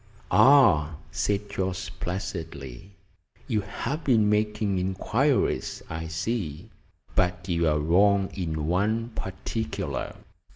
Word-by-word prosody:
"Ah!" 105 - +6 0.2
said 105 0 -1
Jorce 95 0 -3
placidly, 85 -4 -6 0.5
"you 110 -6 +1
have 140 +9 -4
been 110 -7 +3
making 105 -2 +1
inquiries, 110 +9 0
I 80 0 -4
see. 80 -2 -3 0.4
But 90 +1 0
you 85 -2 +1
are 75 -1 +3
wrong 95 +6 +3
in 80 -5 -3
one 105 +7 0
particular. 110 +1 -4
95 Hz, 100 wpm, -26 LUFS, 85-105 Hz, 0.5 s, Ah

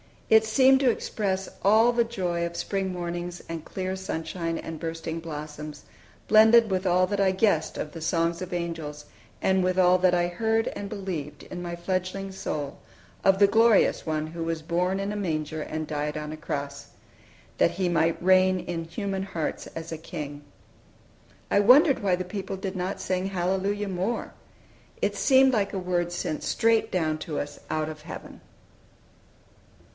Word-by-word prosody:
It 220 0 +7
seemed 260 +4 +5
to 265 -2 +4
express 195 -4 -2
all 220 +4 +5
the 235 -1 +2
joy 180 -7 -2
of 170 0 -5
spring 195 0 -2
mornings 175 0 -5
and 165 -1 -5
clear 185 0 -3
sunshine 165 -2 -3
and 165 -1 -6
bursting 165 0 -4
blossoms, 150 -2 -7 0.5
blended 220 0 +7
with 190 0 0
all 180 +1 +4
that 205 0 -2
I 195 -1 +4
guessed 190 -5 +1
of 150 - -4
the 165 - -8
songs 165 +1 0
of 185 0 -5
angels, 165 -4 -4 0.4
and 190 0 +3
with 185 0 +1
all 180 0 +5
that 180 -1 +4
I 175 - +2
had 175 0 -2
heard 225 +2 +1
and 200 - -6
believed, 175 -8 -5
in 175 - -7
my 170 -1 -4
fledgling 185 +2 -3
soul, 150 -6 -4 0.5
of 195 0 +5
the 200 - +7
glorious 225 +1 +4
One 155 -1 -1
who 165 +1 -5
was 165 -1 -2
born 180 +3 0
in 200 +1 -2
a 210 - -3
manger 155 -5 -2
and 155 +1 -4
died 150 0 -3
on 150 0 -5
a 155 - -6
cross, 140 -3 -5 0.7
that - - +4
He 185 -1 -1
might 165 -1 +2
reign 185 0 +5
in 165 -1 -4
human 195 +3 -3
hearts 170 -5 -4
as 165 0 -6
a 160 - -3
king. 150 -3 -7 1.1
I - - +5
wondered 265 - +6
why 190 -3 +2
the 185 - -3
people 195 +1 -5
did 190 0 -5
not 185 +2 -3
sing 185 0 -1
"Hallelujah" 195 +2 -1
more. 190 +6 -2 0.7
It - - 0
seemed 265 -1 +5
like 205 -3 0
a - - -2
word 175 -2 -1
sent 155 -3 -3
straight 225 -1 +2
down 155 -5 0
to 155 -2 -5
us 145 - -4
out 155 0 -1
of 155 -1 -8
heaven. 160 - -9
180 Hz, 175 wpm, -26 LUFS, 165-195 Hz, 1.1 s, It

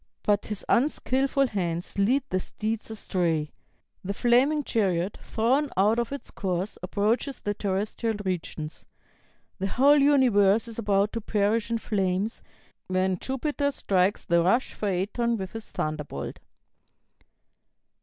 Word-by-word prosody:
But 205 -1 +1
his 210 -2 -5
unskilful 275 +1 +2
hands 175 -2 -3
lead 250 +8 +3
the 185 - +1
steeds 220 +4 -4
astray. 170 -8 -1 0.5
The 200 +2 -3
flaming 265 +7 +3
chariot, 195 -6 0
thrown 260 +6 +1
out 210 +4 +4
of 235 +1 -2
its 280 - -6
course, 185 0 -3
approaches 215 +8 0
the 205 - -2
terrestrial 205 +3 -2
regions. 165 -4 -4 0.8
The 195 - -1
whole 280 +8 +5
universe 235 -7 +4
is 230 0 -7
about 205 -1 +2
to 230 - -3
perish 210 +2 +1
in 230 - +1
flames, 200 0 -1 0.5
when 185 0 0
Jupiter 285 +2 -1
strikes 195 -7 +1
the 170 0 +3
rash 230 +10 +2
Phaëton 210 +4 0
with 190 -2 -5
his 225 -1 -8
thunderbolt." 150 - -4
210 Hz, 125 wpm, -27 LUFS, 185-235 Hz, 0.8 s, whole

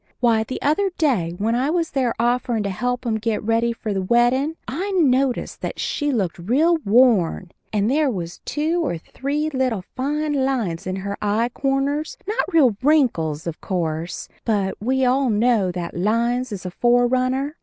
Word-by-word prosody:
Why, 230 -2 +3
the 255 - -5
other 310 +8 +2
day 205 - +1
when 220 +4 0
I 255 +4 +1
was 335 0 0
there 255 -4 0
offerin' 240 -1 +1
to 200 - -2
help 245 +6 -2
'em 220 -2 0
get 215 -1 -1
ready 230 +2 +1
for 225 -2 -4
the 195 - -1
weddin' 240 +9 +2
I 355 +10 -3
noticed 270 -6 +1
that - - -4
she 290 -1 -1
looked 190 -9 -1
real 290 - +2
worn, 210 - +3 0.2
and 210 -1 +1
there 290 +3 +2
was 175 -6 -5
two 325 +3 -1
or 220 - -1
three 290 - -3
little 255 -8 -1
fine 290 +1 -1
lines 225 -12 -1
in 185 - -2
her 200 +1 -5
eye 215 +3 +1
corners 275 +4 -1
not 425 -1 -1
real 270 -10 +4
wrinkles, 230 - +2
of 170 -2 -5
course 170 -2 -3 0.2
but 200 -4 0
we 260 +4 +1
all 260 +1 +2
know 215 -3 +2
that 175 -1 -5
lines 235 +6 0
is 190 -3 -6
a 180 - -4
forerunner. 255 - +1
240 Hz, 175 wpm, -22 LUFS, 200-275 Hz, 0.2 s, real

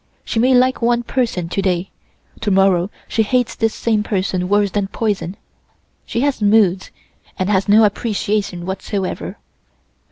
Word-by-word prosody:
She 225 - -1
may 255 +2 +4
like 255 +1 +3
one 240 0 +2
person 235 -9 -1
to 195 - -1
day, 185 -1 -1 0.5
to 220 - -1
morrow 190 -2 +3 0.2
she 225 - 0
hates 245 +2 +1
this 225 -1 -1
same 220 -2 0
person 185 -3 -1
worse 205 -1 +2
than 200 0 -1
poison. 200 -3 -2 0.7
She 235 - -1
has 280 -4 0
moods, 205 -3 +3 0.5
and 185 +2 -1
has 195 0 +1
no 215 +2 +6
appreciation 205 -4 -1
whatsoever. 190 0 -4
205 Hz, 150 wpm, -18 LUFS, 190-225 Hz, 0.7 s, no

